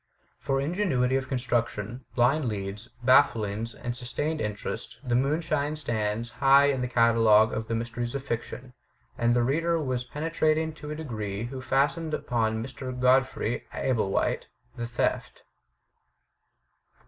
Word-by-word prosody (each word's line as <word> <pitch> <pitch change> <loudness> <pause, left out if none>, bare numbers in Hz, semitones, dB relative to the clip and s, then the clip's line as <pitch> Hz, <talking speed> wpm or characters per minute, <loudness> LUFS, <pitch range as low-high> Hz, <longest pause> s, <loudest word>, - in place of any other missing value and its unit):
For 135 0 0
ingenuity 140 -5 +1
FURTHER 135 0 +1
ADVICES 125 0 -3
313 115 -4 0
of 110 - -9
construction, 125 +2 -10
blind 130 +5 +3
leads, 105 0 -4 0.2
bafflings, 115 -4 +3
and 120 -1 -4
sustained 145 +6 -3
in 105 -1 -2
terest - - -6
The 120 - 0
Moonstone" 150 +3 +1
stands 115 -5 -2
high 140 +3 +5
in 130 -2 -2
the 125 - -1
catalogue 115 -2 +4
of 110 0 -3
the 115 - -1
mysteries 120 +2 -3
of 135 - -3
fiction; 125 0 -5 0.4
and 120 0 +2
the 120 - +3
reader 165 +6 +1
was 130 -4 -1
penetrating 155 +3 0
to 150 -1 -9
a 150 - -3
degree 110 -9 -4
who 130 +2 -6
fastened 145 +5 +1
upon 110 -2 -1
Mr. 130 0 -6
Godfrey 125 -2 +2
Ablewhite 110 -7 0 0.3
the 120 -2 -4
theft. 120 - -2
125 Hz, 150 wpm, -27 LUFS, 115-140 Hz, 0.4 s, high